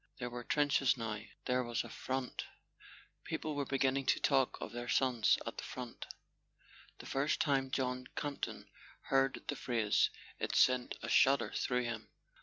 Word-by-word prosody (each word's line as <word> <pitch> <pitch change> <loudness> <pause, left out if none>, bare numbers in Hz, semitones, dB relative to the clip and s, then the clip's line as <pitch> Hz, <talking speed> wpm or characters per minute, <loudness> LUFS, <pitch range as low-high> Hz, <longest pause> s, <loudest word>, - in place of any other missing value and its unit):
There 125 -2 -4
were 120 0 -5
trenches 140 -1 +3
now, 110 -2 -3 0.2
there 125 0 +2
was 120 -1 -1
a - - -9
"Front"—people 130 +3 -6
were 140 -2 -1
beginning 135 0 +1
to - - +4
talk 135 -3 +2
of - - -5
their 120 +1 -5
sons 125 -5 +3
at - - -5
the - - -5
front. 125 -2 -7 0.9
The - - -11
first 140 +3 0
time 135 -3 +2
John 125 -1 -1
Campton 145 -1 -4 0.4
heard 135 0 +2
the 145 - -1
phrase 115 -6 +2 0.3
it - - -2
sent 125 -1 +4
a - - -3
shudder 135 -1 +4
through 125 -1 0
him. 115 -2 -4
130 Hz, 155 wpm, -35 LUFS, 120-135 Hz, 0.9 s, to